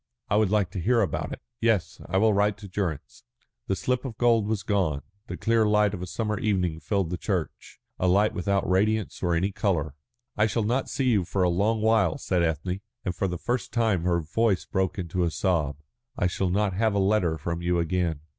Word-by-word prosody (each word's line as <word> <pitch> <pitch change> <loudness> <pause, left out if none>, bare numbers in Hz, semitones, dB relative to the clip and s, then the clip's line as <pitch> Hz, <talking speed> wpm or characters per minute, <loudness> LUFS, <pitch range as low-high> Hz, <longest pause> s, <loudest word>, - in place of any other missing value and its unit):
I - - +4
would 110 -3 +3
like 100 -3 +1
to 100 - -4
hear 115 +6 +3
about 100 - -2
it." - - -8 0.2
"Yes, 115 -5 0
I 95 - +1
will 110 +2 +4
write 105 0 +2
to 100 - -10
Durrance." 90 -6 -4 0.4
The 95 - +1
slip 125 +5 -1
of 120 -5 -6
gold 115 -3 +3
was 110 -2 -1
gone, 90 -9 0 0.2
the - - -5
clear 115 -1 +2
light 105 -1 +3
of 95 - -5
a 90 - -4
summer 105 +1 -2
evening 90 -6 0
filled 90 +2 -1
the 90 - -3
church, - - -4 0.2
a 90 - +2
light 100 +4 +3
without 100 +1 0
radiance 105 +3 +1
or 85 -2 +1
any 95 +4 0
colour. 85 - -1 0.4
"I 105 +1 +3
shall 110 +2 -1
not 120 +5 0
see 130 -2 0
you 100 -5 +3
for 95 +2 -1
a 90 - +3
long 105 +5 +1
while," 110 -7 +3
said 90 -2 0
Ethne, 85 +4 -1 0.2
and 90 -2 -2
for 95 - 0
the 90 -1 -3
first 120 +7 -2
time 110 -7 +1
her 85 0 +1
voice 100 +4 0
broke 95 +1 -1
in 85 -4 -5
a 85 - +2
sob. 80 -6 0 0.4
"I - - +1
shall 90 +1 0
not 100 +1 +1
have 110 +2 +1
a - - +2
letter 95 -5 +2
from 85 +3 -4
you 90 0 +1
again." 85 -2 0
95 Hz, 220 wpm, -26 LUFS, 90-110 Hz, 0.4 s, I